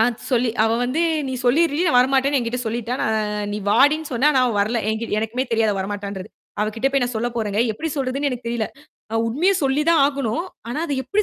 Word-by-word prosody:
அ - - +6 0.3
சொல்லி 245 -2 +2
அவ 225 - +2
வந்து 255 +6 -1 0.3
நீ 260 - -3
சொல்லீர்றி, 295 +5 +2
நான் 280 -7 +3
வர 250 - +5
மாட்டேன்னு 275 +1 +3
என்கிட்ட 240 0 -2
சொல்லிட்டா. 235 +2 -2
நான் 210 -1 -1
நீ 210 - -2
வாடின்னு 290 +7 +3
சொன்னேன். 270 +6 +3
ஆனா 265 -3 +3
அவ 240 - 0
வரல. 220 +4 +1
என்கி 220 +1 -2
எனக்குமே 230 +4 -1
தெரியாது 225 -2 +2
அவ 195 - -3
வரமாட்டான்றது. 200 0 -5 0.3
அவ 210 - +1
கிட்டபோய் 270 +3 +1
நான் 245 0 -2
சொல்லப் 240 +2 -2
போறேங்க. 210 -2 0
எப்படி 320 +10 -4
சொல்றதுன்னு 275 +1 -1
எனக்குத் 245 -2 -5
தெரியல. 235 -2 -1 0.5
அ - - -2
உண்மையச் 355 +11 +1
சொல்லிதான் 300 +4 +3
ஆகணும். 280 +2 -2 0.2
ஆனா 245 - -3
அத 290 - -3
எப்டி 400 +12 0
245 Hz, 210 wpm, -21 LUFS, 220-280 Hz, 0.5 s, அ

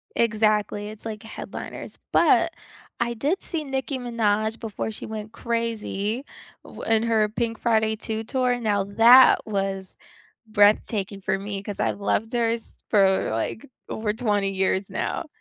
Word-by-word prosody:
Exactly, 215 -2 +1
it's 215 +1 -10
like 215 -1 -5
headliners, 220 - -8
but - - +4 0.5
I 235 0 0
did 290 - -1
see 325 -4 -3
Nicki 270 -1 -3
Minaj 220 -2 0
before 220 -1 -4
she 215 - -7
went 215 0 -6
crazy 230 0 -2 0.4
w - - -11
in 225 0 +2
her 220 -2 +2
Pink 230 0 -2
Friday 220 -2 +2
2 220 0 -4
Tour, 250 0 0
now, 205 -3 +1
that 230 +6 +7
was 195 -2 -3 0.5
breathtaking 205 -1 +2
for 190 +1 0
me 200 0 -5
'cause 205 0 -6
I've 205 - 0
loved 225 +3 0
her 230 -1 +2
s 230 -1 -6
for, 195 -2 +3
like, 115 - -3 0.2
over 215 -1 -2
20 205 -4 0
years 190 0 0
now. - - -3
220 Hz, 150 wpm, -24 LUFS, 205-230 Hz, 0.5 s, that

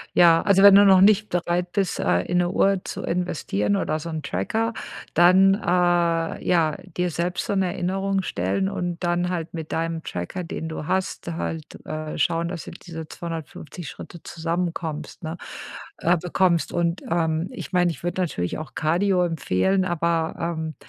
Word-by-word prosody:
Ja, 170 -2 +6
also 195 -1 +4
wenn 200 0 +9
du 200 - +8
noch 190 -1 +7
nicht 210 +2 +5
bereit 175 0 -1
bist, 195 -4 -1
äh, 90 +1 +2
in 180 0 0
'ne 175 0 +1
Uhr 195 -1 +2
zu - - -5
investieren 105 - -1
oder 155 - -1
so 165 +2 -6
'n 160 -1 -4
Tracker, 225 - -1 0.4
dann, 185 +3 +6
äh, 175 -3 +1
ja, 160 -4 +2 0.2
dir 180 0 +1
selbst 175 +2 -2
so 200 - -1
'ne 190 -1 +2
Erinnerung 195 +2 -1
stellen 95 - -1
und 175 - -3
dann 175 +1 +1
halt 170 -2 -4
mit 160 -2 -6
deinem 165 0 -2
Tracker, 90 - -5
den 165 -1 -5
du 160 -1 -5
hast, 190 -1 -2
halt, 160 -1 -5
äh, 155 0 -5
schauen, 165 +2 +1
dass 175 -3 -6
du - - -8
diese 160 -2 -9
250 165 -1 -7
Schritte 170 - -10
zusammenkommst, 165 -2 -4
ne 160 +2 -4 0.6
äh, 175 +2 +3
bekommst. 175 -1 +1
Und, 170 +1 0
ähm, 160 0 0
ich - - -8
meine, 180 -1 +3
ich 155 - -10
würde 175 +2 -1
natürlich 90 - -2
auch 155 - -8
Cardio 180 +4 +2
empfehlen, 175 - +1
aber, 170 -2 0
ähm, 160 -2 -3
170 Hz, 170 wpm, -24 LUFS, 160-180 Hz, 0.6 s, wenn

